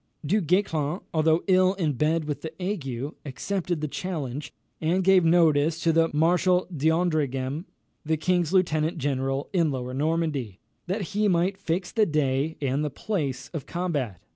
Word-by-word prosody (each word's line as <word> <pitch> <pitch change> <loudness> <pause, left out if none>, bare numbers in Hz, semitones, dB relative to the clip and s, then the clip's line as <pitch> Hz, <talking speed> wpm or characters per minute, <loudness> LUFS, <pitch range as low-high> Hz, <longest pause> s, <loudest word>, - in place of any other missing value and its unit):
Du 205 +8 +2
Guesclin, 170 -2 0
although 160 +1 +3
ill 185 0 +4
in 165 -6 0
bed 155 +4 +1
with 145 -2 -4
the 160 - -5
ague, 145 - -3
accepted 170 +5 -3
the 155 - -1
challenge, 145 -5 -4 0.3
and 175 +4 +1
gave 190 -1 +5
notice 160 -2 +3
to 165 0 +2
the 165 0 +3
Marshal 180 +4 +2
d'Andreghem, 155 -2 0 0.4
the 160 +1 0
king's 175 0 +1
lieutenant 165 -4 +2
general 135 -1 -1
in 170 -4 +3
Lower 125 -2 -4
Normandy, 145 - -1 0.3
that 190 0 -2
he 210 +1 +2
might 185 +1 +1
fix 180 -1 -2
the 220 -3 +2
day 150 0 0
and 140 +1 0
the 150 - -1
place 140 - -3
of 155 -6 -6
combat. 145 - -2
160 Hz, 155 wpm, -26 LUFS, 145-180 Hz, 0.4 s, gave